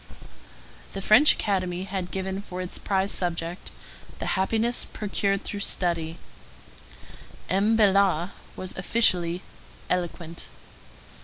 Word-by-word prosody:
The 195 - -4
French 255 +10 +7
Academy 185 -3 -1
had 190 -2 -4
given 190 +1 -3
for 185 -2 -7
its 185 -1 -3
prize 195 0 0
subject, 170 0 -3 0.5
The - - -2
Happiness 225 +5 +1
procured 200 -1 -1
through 205 - -5
Study. 170 -4 -1 1.3
M. 205 +4 +3
Bellart 195 -4 +4 0.2
was 185 0 -6
officially 180 -3 +2 0.5
eloquent. 170 -2 -3
190 Hz, 100 wpm, -26 LUFS, 175-200 Hz, 1.3 s, French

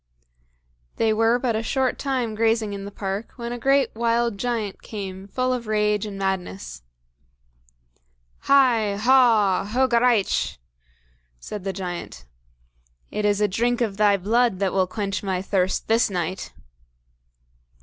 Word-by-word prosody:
They 220 -1 +2
were 225 +2 +3
but 245 -2 -1
a 220 - 0
short 260 +2 -1
time 255 -5 -1
grazing 225 -1 +1
in 200 0 -6
the 200 - -7
park 200 +2 -5
when 235 -1 -6
a 245 - -5
great 270 0 +2
wild 235 0 0
giant 230 -4 -3
came 195 -2 -7
full 255 +4 -1
of 240 -3 -4
rage 210 -1 +1
and 200 -1 -7
madness. 100 - -4 1.7
"HI! 240 -7 +4
HAW!! 225 -5 +4
HOGARAICH!!!" 240 -1 +2 0.8
said 205 - -7
the 195 - -2
giant. 180 - -6 0.9
"It 210 - -2
is 205 0 +2
a 210 - +4
drink 235 +5 0
of 210 -4 -1
thy 205 -1 +4
blood 225 +2 +1
that 195 -1 -1
will 190 -1 +2
quench 200 0 -3
my 190 -2 -2
thirst 190 -1 -1
this 225 0 +3
night." 180 0 -3
215 Hz, 140 wpm, -23 LUFS, 195-235 Hz, 1.7 s, HI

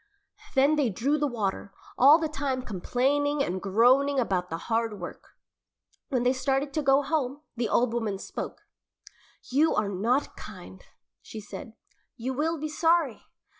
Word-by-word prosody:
Then 280 +3 +4
they 280 -5 +2
drew 275 +9 0
the 295 - +1
water, 200 -5 -3 0.2
all 280 +5 +7
the 325 -1 -1
time 275 -4 -2
complaining 275 +8 0
and 185 -3 -3
groaning 255 +8 +3
about 185 -7 0
the 165 - -3
hard 225 +3 -2
work. - - -10 0.7
When 255 -5 0
they 250 +1 +3
started 270 +2 -1
to 310 - 0
go 275 0 +4
home, 280 -1 -1
the 235 -1 -1
old 240 -1 +2
woman 220 -4 -1
spoke. - - -7 0.9
"You 300 +5 +3
are 210 -1 +1
not 230 +8 0
kind," - - -11 0.4
she 220 - -9
said, 220 +3 -9 0.4
"you 255 +3 -3
will 320 +5 0
be 310 +1 -3
sorry." 325 -4 +1
260 Hz, 155 wpm, -27 LUFS, 225-290 Hz, 0.9 s, all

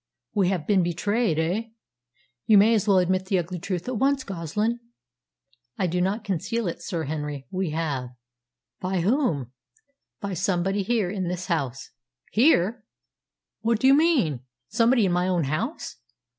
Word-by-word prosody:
"We 195 -4 +2
have 180 -6 -1
been 195 0 +3
betrayed, 180 +3 0
eh? 175 +8 0 0.8
You 215 - +7
may 215 +3 +6
as 215 -2 +1
well 195 -2 +5
admit 185 +1 +1
the 190 - +2
ugly 175 +1 -3
truth 180 +1 -4
at 255 -2 -2
once, 270 +3 +2
Goslin!" 205 - -2 1.0
"I 190 - +1
do 180 +1 0
not 200 +4 0
conceal 210 +3 -2
it, 170 - -4
Sir 170 -5 -3
Henry. 150 -2 -4
We 185 -2 -1
have." 150 -5 -2 0.7
"By 185 -1 -1
whom?" 175 - 0 0.7
"By 200 -2 -4
somebody 190 +3 0
here 200 -3 0
in 190 -3 -3
this 180 0 -3
house." 140 -8 -3 0.4
"Here! 220 - +3 0.8
What 230 -1 +1
do - - 0
you 270 - +7
mean? 275 - +3 0.3
Somebody 235 -1 +3
in 185 - +1
my 180 +1 +1
own 180 -3 +1
house?" 190 - -3
185 Hz, 155 wpm, -25 LUFS, 170-220 Hz, 1.0 s, You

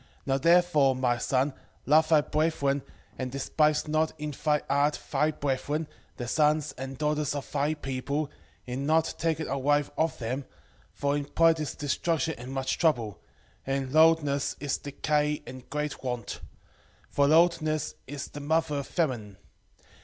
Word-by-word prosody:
4:13 - - -30 0.2
Now 135 -1 +1
therefore, 165 -4 +4
my 125 -2 +1
son, 135 +4 +1 0.3
love 155 +2 +4
thy 155 -2 +6
brethren, 145 -3 0 0.4
and 130 -1 -3
despise 150 +3 +1
not 155 +1 +1
in 150 0 -3
thy 150 +1 0
heart 145 +2 +2
thy 150 +2 +2
brethren, 145 +2 -2 0.3
the 120 - -4
sons 150 +2 +2
and 135 0 -6
daughters 150 -1 0
of 140 - -6
thy 145 +2 0
people, 140 +1 -3 0.3
in 130 +3 -3
not 160 +1 +2
taking 160 -1 0
a 140 - -2
wife 145 +1 +2
of 160 0 +1
them: 130 +3 -3 0.5
for 140 0 0
in 145 -1 -2
pride 165 +2 +3
is 155 -3 -3
destruction 160 +3 0
and 125 +2 -7
much 135 -1 -2
trouble, 120 - +1 0.5
and 135 -1 -1
in - - -9
lewdness 155 -3 +4
is 145 -1 -2
decay 150 +1 -1
and 130 -1 -10
great 150 0 -3
want: 125 -4 -4 0.7
for 140 0 +3
lewdness 155 -1 +3
is 140 0 -5
the 145 - -8
mother 150 0 0
of 140 - -6
famine. 120 - -2
145 Hz, 160 wpm, -28 LUFS, 135-155 Hz, 0.7 s, thy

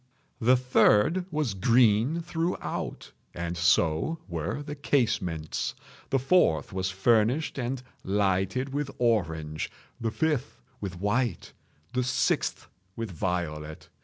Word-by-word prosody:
The 125 +2 +5
third 125 - +4
was 150 - -1
green 115 - +3
throughout, 170 +1 -3 0.2
and 85 0 -3
so 85 - +2
were 145 - -3
the 145 0 -6
casements. 110 - -1 0.3
The 135 - +2
fourth 130 - +2
was 95 0 -1
furnished 115 - +2
and 125 +1 -3 0.2
lighted 100 +6 0
with 145 -1 -1
orange—the 85 -2 -2
fifth 150 - -1 0.2
with 95 -3 -5
white—the 105 - -2
sixth 130 +1 0 0.3
with 115 -3 -4
violet. 80 -3 -3
110 Hz, 105 wpm, -28 LUFS, 90-135 Hz, 0.3 s, The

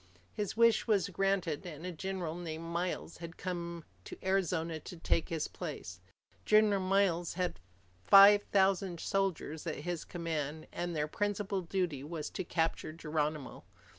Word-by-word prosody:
His 210 +1 -3
wish 230 -1 +5
was 200 -4 +2
granted, 195 -5 0
and 165 -2 -8
a 180 - -3
general 180 -1 -3
named 165 -2 -5
Miles 170 0 -3
had 170 0 -9
come 170 -2 -4 0.2
to - - -8
Arizona 175 -4 0
to 175 - -9
take 165 0 0
his 165 -2 -1
place. 90 0 -7 0.4
General 215 -2 +5
Miles 185 -3 +2
had 180 - -2 0.4
five 200 +1 +9
thousand 190 -3 +1
soldiers 185 -6 -1
at 155 - -1
his 175 -2 -2
command, 160 -3 -3
and 175 -1 -3
their 150 0 0
principal 205 +2 -1
duty 170 -6 -2
was 155 0 -5
to - - -3
capture 165 -2 -1
Geronimo. 150 -3 -3
175 Hz, 145 wpm, -33 LUFS, 160-195 Hz, 0.4 s, five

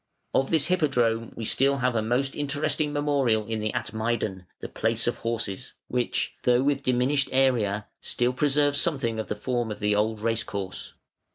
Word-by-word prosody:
Of 135 0 +2
this 160 -3 +2
Hippodrome 125 -10 +1
we 115 - -5
have - - +1
still 135 +1 +3
a 125 -4 +1
most 125 +5 0
interesting 145 +1 -1
memorial 140 -7 +1
in 110 0 -3
the 105 0 -1
Atmeidan 110 -5 -2
(the - - -6
Place 115 +1 0
of 120 - 0
Horses), 115 0 -3 0.2
which, 125 -1 -1
though 125 +1 +3
with 140 0 +1
diminished 130 +2 +1
area, 115 -6 +2 0.2
still 120 +1 0
preserves 145 +1 +2
something 130 -9 -1
of 110 - -3
the - - -2
form 120 +1 -2
of 105 - -5
the 105 0 +1
old 110 +1 +1
racecourse. 100 -4 -3
120 Hz, 170 wpm, -26 LUFS, 110-140 Hz, 0.2 s, still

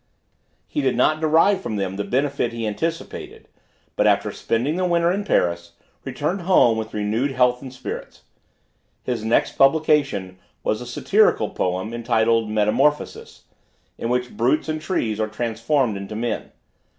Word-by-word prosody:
He - - -2
did 130 -3 0
not 155 +5 +3
derive 165 +5 +3
from 110 - -4
them 95 -2 -2
the 100 - -2
benefit 135 0 -1
he 115 -1 -3
anticipated, 160 +11 -4 0.5
but, - - +2
after - - +2
spending 125 +7 -1
the 185 - 0
winter 170 -1 +2
in 200 +3 -1
Paris, 85 - 0 0.3
returned 150 +8 -2
home 170 -10 +4
with 110 -1 -5
renewed 110 +7 -1
health 125 -1 +2
and 135 -2 -8
spirits. 130 - -8 0.8
His 120 -4 -3
next 110 +2 +1
publication, 135 -10 +2 0.2
was 110 - -1
a 125 - -7
Satirical 155 - +2
Poem, 95 +5 -2
entitled 115 -1 +1
"Metamorphosis," 110 +8 0 0.6
in 115 - -2
which 125 0 -1
brutes 125 +8 +1
and 155 0 -3
trees 115 - -1
are 110 - 0
transformed 115 +3 -1
into 100 +2 -6
men. 115 +2 -3
120 Hz, 150 wpm, -22 LUFS, 110-150 Hz, 0.8 s, home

